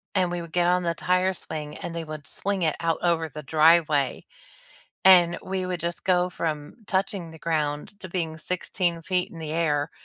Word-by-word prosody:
and 180 Hz, -2 st, +2 dB
we 175 Hz, -1 st, -2 dB
would 170 Hz, -, -9 dB
get 175 Hz, +1 st, +2 dB
on 180 Hz, 0 st, +3 dB
the 170 Hz, -1 st, 0 dB
tire 185 Hz, +2 st, +1 dB
swing, 150 Hz, -4 st, -5 dB
and 170 Hz, -, -6 dB
they 165 Hz, -, -3 dB
would 155 Hz, -2 st, -8 dB
swing 195 Hz, -3 st, -2 dB
it 155 Hz, -, +1 dB
out 165 Hz, -1 st, 0 dB
over 165 Hz, -2 st, +1 dB
the 150 Hz, +1 st, -8 dB
driveway. 155 Hz, -1 st, +3 dB, 0.8 s
And, 175 Hz, -2 st, +7 dB
we 190 Hz, -1 st, -2 dB
would 180 Hz, -2 st, -3 dB
just 170 Hz, +1 st, -4 dB
go 180 Hz, -1 st, +3 dB
from 155 Hz, -4 st, -3 dB
touching 190 Hz, -3 st, -1 dB
the 160 Hz, -, -12 dB
ground, 155 Hz, +4 st, -2 dB
to 185 Hz, -, -7 dB
being 165 Hz, -3 st, -2 dB
16 170 Hz, 0 st, -1 dB
feet 180 Hz, 0 st, 0 dB
in 165 Hz, -, -10 dB
the 155 Hz, -1 st, -5 dB
air, 150 Hz, -3 st, 0 dB
170 Hz, 195 wpm, -25 LUFS, 155-180 Hz, 0.8 s, And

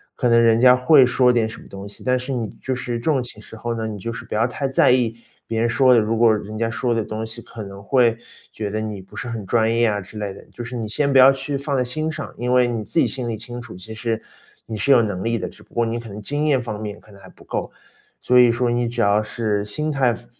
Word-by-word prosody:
可 125 Hz, -, 0 dB
能 115 Hz, 0 st, +5 dB
人 115 Hz, 0 st, +4 dB
家 125 Hz, 0 st, +7 dB
会 130 Hz, +1 st, +6 dB
说 125 Hz, 0 st, +3 dB
点 115 Hz, -2 st, +2 dB
什 110 Hz, -, -10 dB
么 -, -, -15 dB
东 100 Hz, +1 st, -8 dB
西， 100 Hz, -, -12 dB
但 130 Hz, 0 st, +2 dB
是 125 Hz, +2 st, -4 dB
你 115 Hz, -4 st, -2 dB
就 130 Hz, -, -5 dB
是 125 Hz, -1 st, -3 dB
这 115 Hz, -, -9 dB
种 150 Hz, -5 st, +2 dB
情 120 Hz, -3 st, -9 dB
时 105 Hz, -, -12 dB
候 115 Hz, +1 st, -3 dB
呢， 110 Hz, -1 st, -3 dB
你 105 Hz, -2 st, -6 dB
就 115 Hz, +5 st, -4 dB
是 115 Hz, -, -8 dB
不 -, -, -8 dB
要 115 Hz, +3 st, +2 dB
太 135 Hz, +2 st, -3 dB
在 135 Hz, -, +4 dB
意 120 Hz, -3 st, +1 dB, 0.3 s
别 115 Hz, -1 st, -2 dB
人 115 Hz, -, +2 dB
说 130 Hz, +2 st, +5 dB
的。 120 Hz, -, +6 dB
如 110 Hz, +1 st, 0 dB
果 115 Hz, -2 st, +5 dB
人 105 Hz, +1 st, -6 dB
家 115 Hz, 0 st, 0 dB
说 120 Hz, +1 st, -1 dB
的 115 Hz, -, 0 dB
东 110 Hz, +1 st, -5 dB
西， 115 Hz, +1 st, -9 dB
可 115 Hz, -1 st, -9 dB
能 100 Hz, 0 st, -10 dB
会 115 Hz, 0 st, +3 dB, 0.4 s
觉 105 Hz, -2 st, -4 dB
得 110 Hz, -, -2 dB
你 105 Hz, -3 st, -5 dB
不 95 Hz, -, -17 dB
是 125 Hz, -, -5 dB
很 115 Hz, -3 st, -5 dB
专 115 Hz, +2 st, +2 dB
业 115 Hz, 0 st, +3 dB
啊 105 Hz, -1 st, 0 dB
之 100 Hz, +3 st, -11 dB
类 100 Hz, -2 st, -4 dB
的， -, -, -13 dB
就 120 Hz, -, -7 dB
是 120 Hz, +2 st, -7 dB
你 110 Hz, -2 st, -3 dB
先 140 Hz, +6 st, 0 dB
不 135 Hz, -, +4 dB
要 130 Hz, +1 st, +9 dB
去 140 Hz, +1 st, -3 dB
放 140 Hz, +1 st, -2 dB
在 130 Hz, -, +2 dB
心 155 Hz, +6 st, -2 dB
上。 155 Hz, -2 st, -7 dB
因 125 Hz, +1 st, -2 dB
为 125 Hz, -1 st, +4 dB
你 115 Hz, -2 st, -3 dB
自 135 Hz, -, -6 dB
己 -, -, +4 dB
心 130 Hz, -2 st, -4 dB
里 110 Hz, -, -3 dB
清 120 Hz, +2 st, -8 dB
楚， 115 Hz, -4 st, -11 dB
其 100 Hz, +5 st, -9 dB
实 110 Hz, 0 st, -2 dB, 0.4 s
你 110 Hz, -, -5 dB
是 120 Hz, +7 st, +1 dB
有 120 Hz, -, +7 dB
能 100 Hz, -5 st, -2 dB
力 115 Hz, 0 st, 0 dB
的， 95 Hz, -, -4 dB
只 -, -, -18 dB
不 -, -, -28 dB
过 120 Hz, 0 st, +1 dB
你 115 Hz, +1 st, -2 dB
可 115 Hz, -, -10 dB
能 105 Hz, +2 st, -8 dB
经 145 Hz, +7 st, -2 dB
验 140 Hz, -5 st, +3 dB
方 110 Hz, -3 st, -5 dB
面 105 Hz, -1 st, -6 dB
可 105 Hz, -, -19 dB
能 100 Hz, -, -15 dB
还 95 Hz, -, -13 dB
不 -, -, -18 dB
够。 -, -, -4 dB, 0.5 s
所 125 Hz, 0 st, +4 dB
以 120 Hz, -1 st, +7 dB
说， 120 Hz, +1 st, 0 dB
你 120 Hz, 0 st, 0 dB
只 120 Hz, -, -2 dB
要 100 Hz, +1 st, +3 dB
是 105 Hz, -1 st, -2 dB
心 150 Hz, +9 st, -3 dB
态 130 Hz, -4 st, +2 dB
放 115 Hz, -, -11 dB
115 Hz, 325 characters per minute, -21 LUFS, 110-125 Hz, 0.5 s, 要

